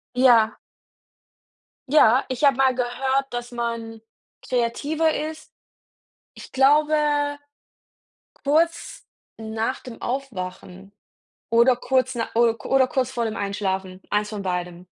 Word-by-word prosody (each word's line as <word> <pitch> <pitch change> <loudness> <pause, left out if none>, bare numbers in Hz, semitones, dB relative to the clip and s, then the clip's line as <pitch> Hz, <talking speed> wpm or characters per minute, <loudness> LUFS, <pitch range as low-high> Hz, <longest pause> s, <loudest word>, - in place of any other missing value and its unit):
Ja. 235 -3 +4 1.3
Ja, 260 -3 +5
ich 255 +3 -4
habe 275 -2 +5
mal 265 -1 +3
gehört, 265 +2 -1
dass 240 0 -5
man 230 -2 -4 0.4
kreativer 290 +7 0
ist 310 +1 -5 0.8
ich - - -12
glaube, 295 +3 +4 1.5
kurz 330 +4 0 0.3
nach 225 +3 -3
dem 245 -2 -10
Aufwachen 195 -6 -6 0.6
oder 235 +2 +5
kurz 260 +1 0
na 230 -1 -2
o 235 0 +4
oder 265 -1 +3
kurz 260 -1 -1
vor 240 -2 -1
dem 220 0 -4
Einschlafen, 190 -2 -3
eins 210 0 0
von 205 -2 -5
beidem. 180 -1 -4
240 Hz, 110 wpm, -23 LUFS, 220-270 Hz, 1.5 s, Ja